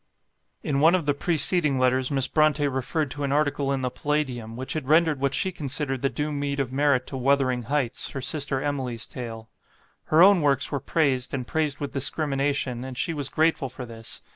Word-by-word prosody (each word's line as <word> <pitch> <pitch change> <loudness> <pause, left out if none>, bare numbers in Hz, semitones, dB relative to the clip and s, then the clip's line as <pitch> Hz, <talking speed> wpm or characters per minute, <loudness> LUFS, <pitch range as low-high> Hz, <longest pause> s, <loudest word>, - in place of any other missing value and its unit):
In 140 -2 0
one 165 +5 +5
of 175 -5 -1
the 145 - +2
preceding 155 -1 +2
letters, 130 0 +2
Miss 135 -2 +1
Brontë 150 -2 +2
referred 135 +2 -2
to 145 - -5
am 140 - -1
article 145 -1 +1
in 135 -1 -1
the 125 -1 -2
Palladium, 130 -7 -2
which 130 +2 -4
had 155 -5 -4
rendered 155 -1 +3
what 140 0 0
she 190 - 0
considered 140 -4 -3
the 135 - +1
due 150 +2 -3
meed 140 -1 -2
of 130 -2 -1
merit 140 -2 +2
to - - -7
"Wuthering 130 -2 +1
Heights", 135 -4 -1
her 135 - -5
sister 140 0 -1
Emily's 130 -5 -3
tale. 115 -3 -7 0.6
Her 160 +3 +5
own 195 -2 +6
works 140 -2 +2
were 140 - -1
praised, 135 -4 0
and 125 -2 -4
praised 150 0 -1
with 145 - -5
discrimination, 140 -3 -1
and 130 -1 -7
she 165 - -1
was 145 -3 -2
grateful 160 -3 +1
for 130 0 -8
this. 115 -1 -7
140 Hz, 200 wpm, -25 LUFS, 130-150 Hz, 0.6 s, own